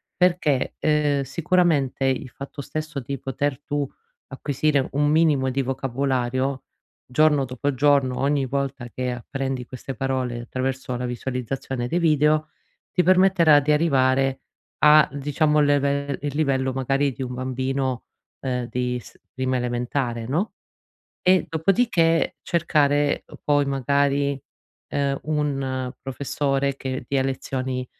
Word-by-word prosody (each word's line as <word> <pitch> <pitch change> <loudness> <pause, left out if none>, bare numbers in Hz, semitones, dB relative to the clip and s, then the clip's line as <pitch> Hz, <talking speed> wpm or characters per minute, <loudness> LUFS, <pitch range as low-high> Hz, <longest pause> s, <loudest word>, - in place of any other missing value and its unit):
Perché, 170 -7 +1
uhm, 150 -2 +2
sicuramente, 145 -2 +1
il 130 0 0
fatto 140 +2 -8
stesso 155 0 -4
di 135 +2 -5
poter 135 +1 -2
tu 145 0 -1 0.4
acquisire 140 0 0
un 145 +2 +1
minimo 150 -4 +3
di 135 +1 -1
vocabolario, 130 0 -1 0.4
giorno 145 +1 +3
dopo 130 +3 -2
giorno, 135 -2 +2
ogni 140 0 +1
volta 135 -2 -3
che 125 +1 -3
apprendi 130 +1 -4
queste 130 +1 -7
parole 130 -1 -2
attraverso 130 +1 -3
la 125 0 -3
visualizzazione 125 0 -3
dei 170 - -1
video, 155 -2 +3 0.5
ti 180 - +4
permetterà 185 -4 +5
di 150 +1 +2
arrivare 135 -3 +2 0.5
a, 150 0 +8
diciamo, 150 +2 +1
il 150 - +4
level 140 0 +1
il 145 0 -2
livello 135 -3 +1
magari 135 +2 0
di 135 - -9
un 125 -1 -5
bambino, 130 0 -2 0.3
uhm, 125 -2 -2
di 125 0 -1
s - - -16
prima 130 0 -1
elementare, 120 -1 -2
no? 170 +11 -1 0.7
E 185 0 +4
dopodiché 165 -1 +2
cercare 145 -4 +1 0.2
poi, 145 -1 +3
magari, 140 +1 +1 0.5
ehm, 140 -1 0
un 135 -4 -1
professore 135 +1 -1
che 130 -2 -4
dia 135 -1 +1
lezioni 130 -1 -3
135 Hz, 125 wpm, -23 LUFS, 130-150 Hz, 0.7 s, a